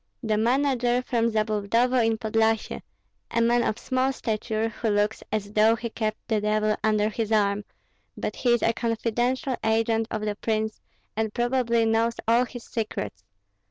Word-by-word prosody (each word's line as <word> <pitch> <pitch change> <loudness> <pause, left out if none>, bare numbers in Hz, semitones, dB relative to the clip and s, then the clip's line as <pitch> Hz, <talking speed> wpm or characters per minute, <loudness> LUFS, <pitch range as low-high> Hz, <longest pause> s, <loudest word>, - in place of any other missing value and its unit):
"The 220 -2 +1
manager 245 +1 +2
from 235 -2 +1
Zabludovo 220 +3 +1
in 225 0 +1
Podlyasye, 220 0 0 0.5
a 230 - 0
man 235 +1 +3
of 215 - 0
small 260 +1 0
stature, 220 -2 -2
who 225 0 -3
looks 205 +1 +1
as 205 -1 -3
though 215 +1 +5
he 230 0 -5
kept 215 -1 -2
the 220 -3 +1
devil 215 0 +1
under 215 -1 +2
his 220 0 -3
arm; 205 -1 +2 0.5
but - - -4
he 250 - 0
is 240 - +2
a 230 - +3
confidential 240 +4 -1
agent 225 0 +1
of 215 - -3
the 210 -1 -1
prince, 220 0 -2 0.3
and 220 -1 -2
probably 240 -1 +1
knows 225 +1 +2
all 235 +2 +4
his 245 -1 -9
secrets. 105 - -4
225 Hz, 160 wpm, -26 LUFS, 215-240 Hz, 0.5 s, though